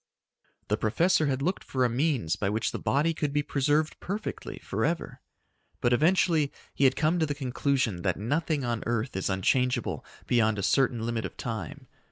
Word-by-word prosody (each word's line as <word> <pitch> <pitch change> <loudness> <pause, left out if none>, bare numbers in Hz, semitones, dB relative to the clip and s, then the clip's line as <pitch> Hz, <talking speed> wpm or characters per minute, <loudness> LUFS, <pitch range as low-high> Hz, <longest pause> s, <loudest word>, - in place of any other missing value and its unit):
The 105 - +2
professor 155 - +2
had 135 0 -1
looked 185 +4 -1
for 130 -1 0
a - - +4
means 120 - 0
by 100 - -1
which 110 +2 0
the - - -4
body 155 +4 +1
could 150 -2 -2
be 145 +1 +1
preserved 145 +3 +1
perfectly 200 +4 -5
forever. - - -2 0.6
But 120 - +2
eventually 160 0 +3 0.2
he 140 - +2
had 130 - +4
come 160 +4 +2
to 160 - +2
the 145 - -2
conclusion 130 -7 0
that 95 -2 0
nothing 145 - -1
on 120 -2 -1
earth 120 +2 -1
is 95 - -1
unchangeable 125 +7 +1 0.2
beyond 110 -3 +2
a 100 - -2
certain 120 0 +2
limit 115 -1 -2
of - - -7
time. 110 -9 -5
130 Hz, 180 wpm, -28 LUFS, 115-150 Hz, 0.6 s, a